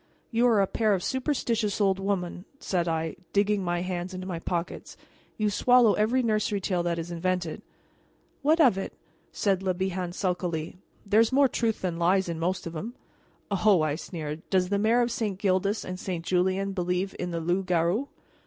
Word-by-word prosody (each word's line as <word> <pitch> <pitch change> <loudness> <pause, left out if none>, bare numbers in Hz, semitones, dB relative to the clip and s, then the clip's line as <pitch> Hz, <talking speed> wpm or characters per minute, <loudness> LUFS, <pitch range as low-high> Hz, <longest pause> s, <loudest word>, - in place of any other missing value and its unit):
"You 235 +1 +3
are 220 -4 +4
a - - +3
pair 215 +1 +1
of 180 - -4
superstitious 240 -6 -1
old 195 -2 +2
women," 190 -2 -2
said 175 -9 -1
I, 160 -1 -2 0.2
digging 205 0 +2
my 175 -1 -1
hands 180 0 -4
into 185 0 -6
my 180 -3 -4
pockets; 170 0 -4 0.4
"you 210 -1 +1
swallow 245 +1 +5
every 235 +5 +2
nursery 215 -2 +1
tale 185 -2 0
that 170 -1 -1
is 165 +1 -5
invented." 175 -1 -2 0.8
"What 310 +4 +3
of 250 - +5
it?" - - -5 0.4
said 195 -3 0
Le 185 -2 0
Bihan 185 -1 -2
sulkily; 180 -3 -2 0.3
"there's 215 +3 +4
more 275 +1 +5
truth 230 -4 -1
than 175 -2 -2
lies 185 +2 +3
in 165 -1 -3
most 180 +2 -1
of 170 0 -6
'em." 225 +10 -5 0.6
"Oh!" 195 -3 +4
I 155 -2 +1
sneered, 155 -1 -5
"does 185 -2 +2
the 200 0 +1
Mayor 225 +4 +3
of 240 0 +1
St. 215 -5 -2
Gildas 195 +2 0
and 185 0 -5
St. 175 -4 -4
Julien 190 +2 +1
believe 180 +1 -1
in 180 - -2
the 170 -1 -2
loup 175 +3 -1
garou?" 180 +9 +1
190 Hz, 185 wpm, -27 LUFS, 175-210 Hz, 0.8 s, swallow